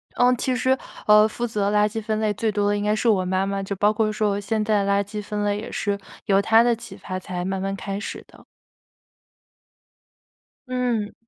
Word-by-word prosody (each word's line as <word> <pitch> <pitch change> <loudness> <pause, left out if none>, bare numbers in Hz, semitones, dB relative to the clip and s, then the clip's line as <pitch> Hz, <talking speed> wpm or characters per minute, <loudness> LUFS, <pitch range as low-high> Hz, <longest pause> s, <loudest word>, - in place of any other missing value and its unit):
嗯， 250 0 +4
其 255 +1 0
实， 260 +1 +2 0.3
呃， 210 0 +7
负 240 +2 -3
责 205 -2 -1
垃 210 0 +4
圾 220 +1 -4
分 215 0 -2
类 215 -1 +1
最 220 +1 -1
多 205 0 +1
的 205 - +1
应 205 - -2
该 210 +1 +2
是 230 +2 +1
我 190 -4 +2
妈 185 +1 0
妈， 195 0 -2
就 200 +1 -4
包 205 +2 +3
括 215 0 0
说 215 -1 0
我 200 0 -1
现 215 +1 -1
在 210 -2 +1
垃 200 0 +2
圾 210 +1 -6
分 210 0 -3
类， 205 0 0
也 215 - -7
是 200 -1 -1 0.3
由 195 -2 +4
她 225 +2 +5
的 240 0 +3
启 230 0 -10
发 185 -1 -6
才 180 -1 -5
慢 190 +1 -2
慢 195 +1 -2
开 195 0 -4
始 - - -6
的。 - - -18 2.2
嗯。 245 -4 -1
210 Hz, 235 characters per minute, -23 LUFS, 200-220 Hz, 2.2 s, 呃